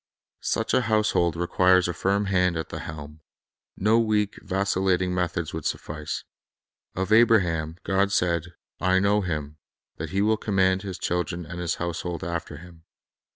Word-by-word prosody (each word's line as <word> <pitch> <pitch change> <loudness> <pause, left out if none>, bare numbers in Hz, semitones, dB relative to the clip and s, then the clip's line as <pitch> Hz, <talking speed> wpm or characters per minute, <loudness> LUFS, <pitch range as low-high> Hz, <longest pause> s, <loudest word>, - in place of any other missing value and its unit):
Such - - -1
a - - +4
household 105 -7 +2
required 90 +1 +3
a 85 - -2
firm 100 +4 0
hand 90 -3 +2
at 80 - -4
the - - -6
helm. 75 -1 -8 0.6
No 110 +4 +3
weak, 105 -2 0
vacillating 95 -2 0
methods 85 -3 -2
would 80 -2 -3
suffice. 75 +1 -4 0.7
Of 95 +2 -2
Abraham 90 -9 +3
God 100 +1 +1
said, 85 -2 0 0.2
"I 95 0 +3
know 100 +2 +3
him, 75 -5 -4 0.4
that - - -5
he 100 +1 +1
will 110 +1 +3
command 95 -3 +1
his 95 -3 -6
children 90 -1 -2
and 90 +3 -7
his 90 0 -1
household 85 -1 -4
after 85 -3 -4
him." 85 0 -14
90 Hz, 155 wpm, -25 LUFS, 85-100 Hz, 0.7 s, a